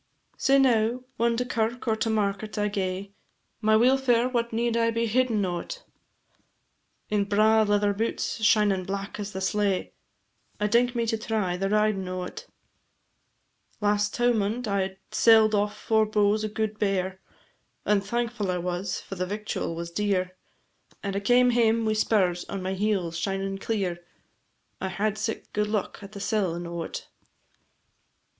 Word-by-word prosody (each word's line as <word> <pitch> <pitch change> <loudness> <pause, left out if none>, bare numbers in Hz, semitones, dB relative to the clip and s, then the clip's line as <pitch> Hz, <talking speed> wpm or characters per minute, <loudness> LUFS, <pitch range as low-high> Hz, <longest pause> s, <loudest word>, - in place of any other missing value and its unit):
Sae 275 +1 +3
now, 245 -2 +3
whan 235 0 +2
to 250 - 0
kirk 235 0 -2
or 220 - +3
to 220 +1 -1
market 210 0 -1
I 210 0 +1
gae 195 0 -3 0.5
My 215 0 +4
weelfare 250 +1 +3
what 235 -1 0
need 230 +1 0
I 230 0 +2
be 230 0 0
hiddin' 225 -3 +1
o't? 185 - -5 1.3
In 205 -1 +2
braw 215 +2 +4
leather 205 -1 +2
boots 220 +1 -2
shinin' 210 -3 +3
black 200 +2 -5
as 205 0 -4
the 190 - -5
slae, 200 -1 0 0.7
I 210 - +1
dink 240 +3 +2
me 235 -1 +1
to 225 -1 -1
try 215 -5 -1
the 195 +2 -1
ridin' 210 -2 +1
o't. 185 - -6 1.3
Last 205 0 +1
towmond 240 -1 +1
I 190 -1 -1
sell'd 220 0 +5
off 205 0 0
four 220 -1 +2
bowes 210 0 +2
o' - - 0
guid 215 0 -3
bear, 190 -2 -1 0.6
And 210 -1 +3
thankfu' 230 0 -2
I 180 - 0
was, 180 +2 -3
for - - -9
the 185 -1 -3
victual 205 -4 -3
was 170 0 -5
dear, 185 -2 -1 0.7
And 200 -1 -3
I - - +1
came 245 +4 +4
hame 230 -1 +3
wi' 215 - +2
spurs 190 -5 +1
on 195 -2 -5
my 190 +1 -2
heels 190 -4 -1
shinin' 195 0 -2
clear, 190 -6 -2 0.8
I 190 - -2
had 205 +3 -1
sic 225 0 -4
good 210 0 0
luck 210 -2 -2
at 200 +1 -11
the 200 - -7
sellin' 185 -5 -1
o't. 170 -1 -5
210 Hz, 155 wpm, -26 LUFS, 195-225 Hz, 1.3 s, sell'd